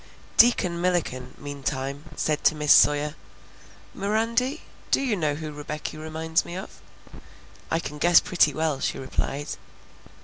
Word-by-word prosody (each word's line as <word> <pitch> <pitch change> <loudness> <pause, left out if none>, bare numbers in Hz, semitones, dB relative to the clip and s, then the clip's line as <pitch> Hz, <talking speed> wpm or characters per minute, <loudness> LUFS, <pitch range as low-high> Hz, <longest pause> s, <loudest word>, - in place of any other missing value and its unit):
Deacon 180 -8 +4
Milliken, 170 -8 -1
meantime, 140 0 -4
said 150 -1 -1
to 155 - +4
Miss 150 -1 +5
Sawyer, 150 0 +4 0.8
"Mirandy, 230 +8 0 0.3
do - - +3
you 260 -6 0
know 155 -5 0
who 155 0 -6
Rebecky 150 +1 -6
reminds 160 +1 -1
me 175 - -8
of?" 190 - -9 0.9
"I - - +1
can 150 -2 -7
guess 175 +2 +6
pretty 170 -4 +2
well," 155 -1 -1
she - - -1
replied. 135 +2 -3
155 Hz, 135 wpm, -25 LUFS, 145-180 Hz, 0.9 s, guess